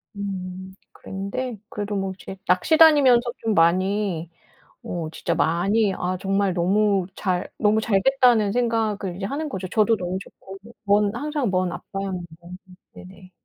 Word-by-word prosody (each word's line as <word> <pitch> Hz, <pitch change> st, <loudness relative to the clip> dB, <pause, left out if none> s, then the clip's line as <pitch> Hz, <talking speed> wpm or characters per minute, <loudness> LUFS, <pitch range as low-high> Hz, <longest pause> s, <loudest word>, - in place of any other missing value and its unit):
음 190 Hz, -1 st, -6 dB, 0.2 s
그랬는데 210 Hz, +5 st, -5 dB
그래도 205 Hz, 0 st, -4 dB
뭐 195 Hz, -1 st, -2 dB
이제 195 Hz, -, -8 dB
낚시 185 Hz, -, +2 dB
다니면서 285 Hz, -7 st, +7 dB, 0.2 s
좀 225 Hz, -1 st, -1 dB
많이 185 Hz, 0 st, +1 dB, 0.6 s
어 170 Hz, -3 st, -4 dB
진짜 165 Hz, +1 st, -2 dB
많이 195 Hz, +6 st, +1 dB
'아 185 Hz, +1 st, -2 dB
정말 195 Hz, -1 st, 0 dB
너무 195 Hz, +1 st, +2 dB
잘 180 Hz, -3 st, -1 dB
너무 215 Hz, 0 st, +3 dB
잘 210 Hz, -3 st, +1 dB
됐다.'는 245 Hz, -6 st, +3 dB
생각을 220 Hz, -6 st, -1 dB
이제 195 Hz, -, -4 dB
하는 295 Hz, +7 st, -3 dB
거죠. 190 Hz, -7 st, -5 dB
저도 220 Hz, +3 st, +2 dB
너무 185 Hz, -1 st, -3 dB
좋고. 195 Hz, 0 st, -13 dB, 0.3 s
먼, 205 Hz, +1 st, +2 dB
항상 290 Hz, -2 st, -2 dB
먼 185 Hz, -1 st, 0 dB
아빠였는데. 190 Hz, -1 st, -5 dB, 0.7 s
네네. 185 Hz, 0 st, -14 dB
195 Hz, 280 characters per minute, -23 LUFS, 185-220 Hz, 0.7 s, 다니면서